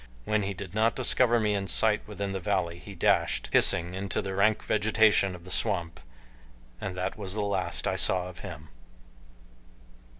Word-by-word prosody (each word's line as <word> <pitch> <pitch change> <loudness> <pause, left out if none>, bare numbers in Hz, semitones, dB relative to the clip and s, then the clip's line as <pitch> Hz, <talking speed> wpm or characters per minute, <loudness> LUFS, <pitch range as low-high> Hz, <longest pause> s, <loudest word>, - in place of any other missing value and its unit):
When 110 0 0
he 100 0 -4
did 95 -1 -9
not 110 +2 +1
discover 125 -2 +3
me 105 -2 0
in 100 -1 -2
sight 110 +1 +4
within 100 -1 -5
the 95 - -4
valley 90 -3 -2
he 100 +1 -11
dashed, - - +1
hissing, 85 +1 +2
into 95 +1 -3
the 95 -2 -4
rank 105 +3 +1
vegetation 105 -2 +2
of 85 - -13
the 90 - -9
swamp 85 -5 -1 0.8
and 95 -2 -5
that 90 +3 -4
was 100 -1 -3
the 110 - -2
last 95 -4 -2
I 95 -1 -1
saw 90 -1 +4
of 90 -1 -11
him. 80 -6 -9
100 Hz, 175 wpm, -27 LUFS, 90-105 Hz, 0.8 s, sight